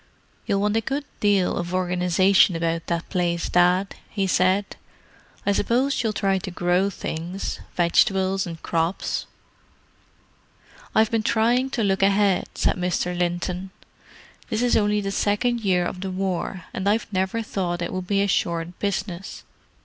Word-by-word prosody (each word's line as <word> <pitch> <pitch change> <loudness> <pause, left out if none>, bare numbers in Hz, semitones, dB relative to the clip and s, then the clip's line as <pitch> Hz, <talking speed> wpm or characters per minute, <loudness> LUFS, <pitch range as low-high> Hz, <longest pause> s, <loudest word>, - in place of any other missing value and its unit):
"You'll 200 0 +1
want 210 +1 +1
a 225 - +2
good 275 +5 -3
deal 200 -3 +2
of 175 +1 -3
organization 180 +1 +3
about 165 0 -1
that 170 -1 -2
place, 175 -2 0
Dad," 180 +2 +3 0.2
he 200 -2 -1
said. 185 +2 +1 0.7
"I 200 - +3
suppose 245 +7 +1
you'll 225 - 0
try 195 -2 +1
to 190 - -6
grow 180 +2 +1
things—vegetables 185 +2 0
and 165 -1 -7
crops?" 165 +2 -1 1.7
"I've 220 0 +4
been 225 -1 +2
trying 235 +4 +2
to 240 -4 -1
look 195 -1 +1
ahead," 195 -1 +3
said - - +1
Mr. 180 0 -1
Linton. 175 +1 -2 0.8
"This 225 0 0
is 245 - +3
only 210 0 +2
the 195 0 -3
second 220 +5 +1
year 185 -4 +2
of 180 - -5
the 190 - -3
War, 185 -1 -3
and 190 +1 -1
I've 215 +2 +1
never 190 +5 0
thought 175 -4 -2
it 170 - -4
would 185 -1 -4
be 200 0 +2
a - - +1
short 170 -2 -1
business. 195 -2 -3
190 Hz, 150 wpm, -24 LUFS, 180-205 Hz, 1.7 s, I've